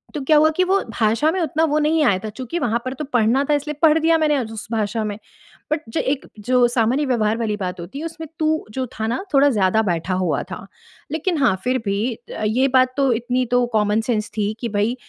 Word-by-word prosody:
तो 295 - -2
क्या 300 +3 +4
हुआ 310 +1 +5
कि 370 - +4
वो 385 +2 +2 0.2
भाषा 230 +8 +2
में 375 - -2
उतना 315 0 0
वो 305 -1 0
नहीं 310 +1 +2
आया 195 - +3
था - - -3
चूँकि 255 +9 -5
वहाँ 235 -3 0
पर 255 - -3
तो 300 - -5
पढ़ना 245 +3 +3
था - - +4
इसलिए 295 +1 -3
पढ़ 315 0 +6
दिया 325 +1 +3
मैंने 300 -2 +2
अ, 260 - 0
उस 220 -1 -8
भाषा 220 0 -1
में। 205 -1 -4 0.5
बट 305 - 0
जो - - -2
एक 270 +1 -2
जो 245 +3 +3
सामान्य 240 +4 +1
व्यवहार 225 -3 +1
वाली 220 -3 -1
बात 185 -2 -4
होती 175 +12 -7
है, 320 - -5
उसमें 325 -1 -7
तू 315 0 +1
जो 260 +2 -2
था 220 - -1
ना, 240 +11 -2
थोड़ा 280 +1 +5
ज़्यादा 210 -2 +2
बैठा 175 -1 -1
हुआ 185 -3 0
था, 195 - -7 0.4
लेकिन 325 +2 -1
हाँ, 220 -7 +4
फिर 255 +1 +1
भी 205 +5 0
अ, 225 -1 -8
ये 250 +5 +2
बात 255 0 +4
तो 275 -2 +3
इतनी 245 +2 -1
तो 245 0 +3
कॉमन 210 0 +2
सेंस 215 -2 0
थी 210 0 0
कि 235 - -3
भई, 210 +4 0
245 Hz, 245 wpm, -21 LUFS, 215-295 Hz, 0.5 s, पढ़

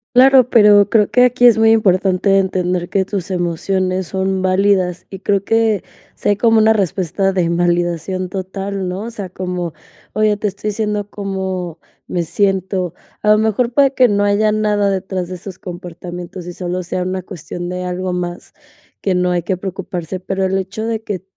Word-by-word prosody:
Claro, 260 -1 +7
pero 210 -4 +6
creo 210 -1 +3
que 250 - +4
aquí 245 0 +3
es 230 -2 +6
muy 225 0 +5
importante 195 -2 +3
entender 180 -2 0
que 195 -1 +1
tus 195 -2 -4
emociones 185 +1 -1
son 190 0 -1
válidas, 185 -1 +1
y 195 - -7
creo 200 0 0
que, 225 -3 +2 0.3
si - - -1
hay 205 - +2
como 225 0 +3
una 220 0 +5
respuesta 195 -1 0
de 180 - +2
invalidación 175 +1 0
total, 195 0 -4
¿no?, 185 +2 -4
o 230 - -5
sea, 205 -5 -6
como: 180 -2 -4 0.4
"Oye, 215 -1 +3
te 210 0 0
estoy 200 +2 -4
diciendo 210 -1 -2
cómo 190 -4 -4 0.3
me 175 - -1
siento", 190 -1 -1 0.3
a 210 - 0
lo 215 - +4
mejor 220 +2 +1
para 280 -1 +5
que 255 -2 +4
no 205 -1 +1
haya 205 +1 +2
nada 210 -1 +1
detrás 190 -2 -2
de 185 - -5
esos 185 +1 -9
comportamientos 175 0 -8
y 175 - -7
solo 180 0 -3
sea 180 +1 -3
una 185 +1 -2
cuestión 175 +1 -7
de 180 0 -4
algo 180 0 -3
más 175 -1 -5 0.5
que 190 - +1
no 180 0 +1
hay 175 -1 0
que 185 +1 -2
preocuparse, 185 -2 -5
pero 195 +1 -3
el 190 +1 0
hecho 195 +4 -3
de 225 -1 -2
que, 195 -5 -4
190 Hz, 185 wpm, -17 LUFS, 180-205 Hz, 0.5 s, Claro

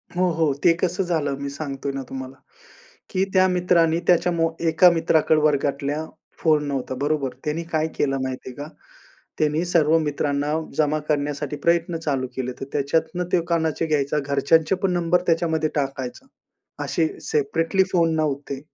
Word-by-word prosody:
हो, 180 0 +2
हो. 160 -3 +1
ते 170 - +6
कसं 185 +1 0
झालं, 155 -6 -1
मी 140 - -3
सांगतोय 140 -1 -4
ना 135 - -3
तुम्हाला 130 0 -7 0.8
की 185 - +1
त्या 185 -1 +5
मित्राने 175 -2 +2
त्याच्या 180 0 +4
मो 165 -1 +1 0.2
एका 165 +3 +6
मित्राकडे 160 -2 +2
वर्गातल्या 145 0 0 0.3
फोन 155 -2 +2
नव्हता 135 -2 -3
बरोबर. 145 -3 0
त्यांनी 155 +3 -2
काय 155 0 +1
केलं 135 -1 +1
माहिती 130 0 -5
आहे 125 - -10
का, 145 +2 -7 0.7
त्यांनी 155 +2 +1
सर्व 165 -2 +3
मित्रांना 145 -1 -1 0.3
जमा 155 0 +2
करण्यासाठी 145 -1 -1
प्रयत्न 170 0 +2
चालू 140 -5 -1
केले. 130 -1 -2
तर - - -3
त्याच्यातनं 160 +5 0
ते 180 - +4
कोणाचे 165 -1 0
घ्यायचा, 150 -1 0
घरच्यांचे 155 +5 +3
पण 195 -2 +2
नंबर 175 0 +2
त्याच्यामध्ये 165 -2 +1
टाकायचा 135 - -3 0.6
असे 165 -2 +1 0.2
सेपरेटली 165 +6 +1
फोन 165 -2 +3
नव्हते. 140 -3 -2
155 Hz, 155 wpm, -23 LUFS, 140-165 Hz, 0.8 s, ते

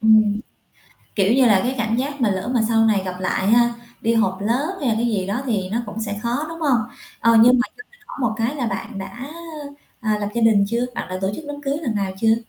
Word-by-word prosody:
Ừm, 215 -1 +4 0.7
kiểu 200 +1 +3
như 260 -2 +5
là, 200 -4 +5
cái 255 +2 -1
cảm 225 0 0
giác 280 +2 -3
mà 225 - +3
lỡ 190 +4 -2
mà 240 - +3
sau 225 -1 +4
này 205 -3 +2
gặp 185 -1 -5
lại 190 +1 0
ha, 235 +1 +4 0.3
đi 230 0 +1
họp 190 -4 +1
lớp 260 - 0
hay 265 - 0
là 225 - +2
cái 230 +2 0
gì 200 -5 -1
đó 210 +7 -2
thì 200 -6 -1
nó 230 - 0
cũng 210 +2 -6
sẽ 205 -2 -3
khó, 245 +6 -1
đúng 330 0 -8
hông? 275 -6 +3 0.4
Ờ, 230 0 +5
nhưng 245 +2 +7
mà - - +4
cho 430 - -10
mình 485 - -24
hỏi - - -9
một 225 -3 +1
cái 230 +5 -1
là 245 -4 -1
bạn 205 +1 -4
đã, 245 +8 -7 0.7
à, 215 -3 0
lập 205 - -1
gia 235 - 0
đình 215 -3 +5
chưa, 235 +3 0
bạn - - -4
đã 185 0 -4
tổ 190 - 0
chức 315 - -8
đám 290 0 -6
cưới 280 0 -1
lần 235 -7 -1
nào 195 -2 -1
chưa? 225 0 +5
225 Hz, 265 wpm, -21 LUFS, 205-245 Hz, 0.7 s, nhưng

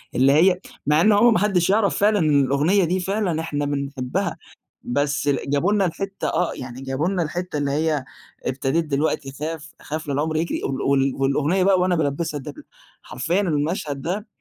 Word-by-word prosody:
اللي 135 +2 +4
هي 180 +4 +4 0.3
مع 150 +2 +4
إنه 210 +3 +5
هو 235 +4 +6
ما 215 - +3
حدش 190 -4 +2
يعرف 200 0 +2
فعلًا 210 +1 +3
إن 150 -4 +3
الأغنية 150 +9 +2
دي، 180 +3 0
فعلًا 185 -3 -1
إحنا 145 -3 -2
بنحبها، 140 +5 -2 0.5
بس 145 +3 -1
ال 140 0 -1
جابوا 145 +8 +2
لنا 205 -2 +2
الحتّة 195 +3 -3
آه، 180 - 0
يعني 125 0 -8
جابوا 135 +5 -1
لنا 190 -2 0
الحتّة 175 0 -3
اللي 140 -1 -1
هي: 150 -1 0 0.4
"ابتديت 135 +5 0
دلوقتي 145 -1 -1
أخاف، 155 +2 -6
أخاف 155 +1 -5
لَا 140 - -1
العُمْر 155 +3 -1
يجري." 165 +2 -2
وال 135 0 -2
وال 135 -1 +2
والأغنية 145 +7 +1
بقى 190 -1 +4
وأنا 180 -1 +2
بالبسها 150 0 -1
الدبلة، 285 - -9 0.4
حرفيًا 175 +4 -1
المشهد 150 -4 -1
ده، 200 - -3
155 Hz, 185 wpm, -22 LUFS, 140-185 Hz, 0.5 s, هو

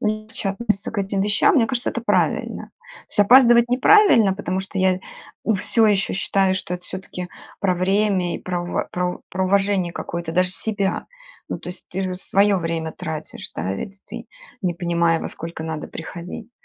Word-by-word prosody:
легче 215 -1 -1
относятся 210 0 -1
к 225 - -4
этим 195 0 -1
вещам, 210 - +3
мне 245 -7 +4
кажется 255 -2 -1
это 235 - -4
правильно. 235 - 0 0.4
То - - -28
есть - - +1
опаздывать 240 +2 +7
неправильно, 250 - +5
потому 190 -2 -3
что 190 +1 -6
я, 185 -1 +2 0.5
у 220 - +2
всё 220 +3 +3
еще 200 -2 +1
считаю, 195 0 +1
что 180 -1 -4
это 180 - -8
всё-таки 180 -1 -6 0.3
про 190 -3 +2
время 190 -1 +1
и - - -3
про 175 -1 -3
в 175 - -2
про 180 0 -2
про 190 +1 -1
уважение 195 -2 +1
какое-то 170 -1 -5
даже 180 +1 +2
себя. 200 0 -2 0.4
Ну - - -4
то - - -8
есть 180 0 -9
ты 190 +2 -3
же 185 -1 -2
свое 200 +2 +3
время 165 -1 -2
тратишь, 155 -1 -6
да, 95 +3 -2
ведь 195 - -7
ты - - -8 0.3
не 180 -5 -1
понимая 170 -1 +1
во - - -4
сколько 165 -1 -6
надо 160 -1 -4
приходить. 175 +7 -8
190 Hz, 185 wpm, -22 LUFS, 175-210 Hz, 0.5 s, опаздывать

